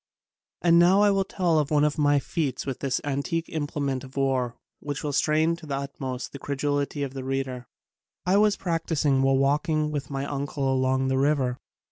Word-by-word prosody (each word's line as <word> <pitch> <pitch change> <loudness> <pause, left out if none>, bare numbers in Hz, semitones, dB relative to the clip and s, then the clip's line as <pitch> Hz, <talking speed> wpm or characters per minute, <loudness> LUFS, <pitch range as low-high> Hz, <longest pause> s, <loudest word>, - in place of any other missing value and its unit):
And 170 -1 +6
now 185 +4 +5
I 205 - +5
will 195 -1 +2
tell 180 -5 +1
of 150 - -1
one 150 -1 +3
of 150 +1 +1
my 145 -1 +4
feats 140 0 -2
with 135 -2 -4
this 135 -2 -1
antique 145 +4 -2
implement 145 -4 -2
of 130 +1 -12
war 130 -3 0 0.2
which 145 -1 -5
will 145 -1 -2
strain 155 +3 +2
to 165 -2 -12
the 140 -1 -2
utmost 135 -2 -5
the 140 - -8
credulity 145 +1 -1
of 135 -1 -4
the 135 -1 -5
reader. 130 -2 -3 0.6
I 185 +2 +3
was 210 -1 +3
practicing 160 -5 0
while 135 0 +3
walking 150 +3 +1
with 145 -3 -4
my 135 -1 -3
uncle 140 -1 -2
along 130 0 +1
the 130 0 +1
river. 135 -3 +1
145 Hz, 190 wpm, -26 LUFS, 135-155 Hz, 0.6 s, And